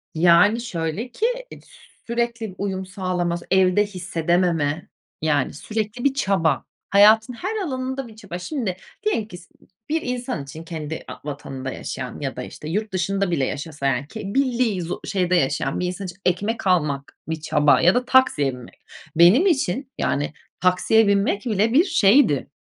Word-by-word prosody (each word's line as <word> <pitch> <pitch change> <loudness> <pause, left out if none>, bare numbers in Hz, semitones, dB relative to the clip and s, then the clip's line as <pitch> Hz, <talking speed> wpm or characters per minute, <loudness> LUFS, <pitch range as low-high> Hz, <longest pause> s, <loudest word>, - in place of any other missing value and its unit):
Yani, 175 +7 +5
şöyle 190 +3 -4
ki 435 - -1 0.3
ed - - -11
sü - - -20 0.2
sürekli 235 -3 -2
uyum 190 -1 -3
sağlaması, 180 -2 -2
evde 190 +2 +4
hissedememe, 170 -4 0 0.3
yani, 150 -3 +1
sürekli 215 +7 -4
bir 280 - +3
çaba, 195 - +1 0.3
hayatın 220 +4 +6
her 380 - -4
alanında 260 -2 -3
bir 220 - -14
çaba. 200 -5 -7
Şimdi, 215 - -3 0.3
diyelim 415 - 0
ki 180 -5 -10
s 175 - -15 0.2
ı - - -21
ı - - -31 0.2
bir 320 +1 +1
insan 250 - -3
için 155 +4 -9
kendi 160 -1 -6
a - - -7
vatanında 135 -2 -6
yaşayan - - -6
ya - - -4
da, - - -5
işte, 155 - -8
yurt 210 +5 -2
dışında 195 +1 0
bile 140 -6 +1
yaşasa, 145 -1 -5
yani, 135 +2 0
ki 220 +6 -8
bildiği 245 -7 +1
zo 170 0 -4
şeyde 180 -2 +1
yaşayan 135 -6 0
bir 180 - -1
insan 185 +2 -5
için 175 -1 -8
ekmek 200 +5 0
almak 150 -6 0
bir 160 -1 -3
çaba 150 -2 +3
ya 180 +5 +5
da 250 - +1
taksiye 255 - +3
binmek. 125 -1 -12 0.4
Benim 180 - +6
için, 270 - 0
yani, 145 +1 -1 0.3
taksiye 185 +4 +3
binmek 200 +2 +1
bile 220 +1 +1
bir 315 +6 +6
şeydi, 215 - +4
190 Hz, 170 wpm, -22 LUFS, 165-230 Hz, 0.4 s, hayatın